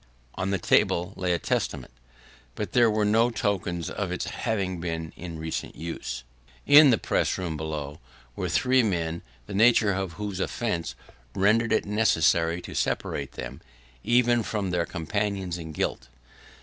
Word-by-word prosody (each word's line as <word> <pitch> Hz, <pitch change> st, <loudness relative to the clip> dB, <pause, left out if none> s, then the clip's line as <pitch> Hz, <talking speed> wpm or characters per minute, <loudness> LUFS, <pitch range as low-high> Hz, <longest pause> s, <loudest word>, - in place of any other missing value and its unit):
On 95 Hz, -, -2 dB
the 100 Hz, -, +1 dB
table 90 Hz, +1 st, +2 dB
lay 90 Hz, -1 st, -1 dB
a 85 Hz, -, +2 dB
Testament, 70 Hz, -, -2 dB, 0.6 s
but -, -, -4 dB
there 120 Hz, -2 st, +5 dB
were 105 Hz, -1 st, +1 dB
no 115 Hz, +3 st, +4 dB
tokens 100 Hz, -6 st, -2 dB
of 100 Hz, -4 st, -3 dB
its 90 Hz, -, -2 dB
having 95 Hz, -6 st, -2 dB
been 80 Hz, -1 st, -4 dB
in 85 Hz, -2 st, -7 dB
recent 80 Hz, 0 st, -4 dB
use. 80 Hz, -7 st, -5 dB, 0.4 s
In 145 Hz, 0 st, +9 dB
the 115 Hz, -, +4 dB
press -, -, 0 dB
room 90 Hz, -4 st, -3 dB
below, 75 Hz, -2 st, -5 dB, 0.4 s
were -, -, -3 dB
three 130 Hz, 0 st, +3 dB
men, 85 Hz, -6 st, -1 dB, 0.2 s
the -, -, -8 dB
nature 110 Hz, 0 st, +5 dB
of 95 Hz, -3 st, -3 dB
whose 105 Hz, -1 st, -5 dB
offence 95 Hz, -4 st, -2 dB, 0.4 s
rendered 110 Hz, +4 st, +3 dB
it -, -, +2 dB
necessary 85 Hz, -5 st, +2 dB
to -, -, -8 dB
separate 70 Hz, -1 st, -2 dB
them, 65 Hz, 0 st, -7 dB, 0.4 s
even 120 Hz, 0 st, +3 dB
from 105 Hz, -4 st, -2 dB
their 85 Hz, -1 st, 0 dB
companions 95 Hz, +1 st, -2 dB
in 80 Hz, -1 st, -7 dB
guilt. 75 Hz, -, -2 dB
95 Hz, 155 wpm, -26 LUFS, 85-110 Hz, 0.6 s, In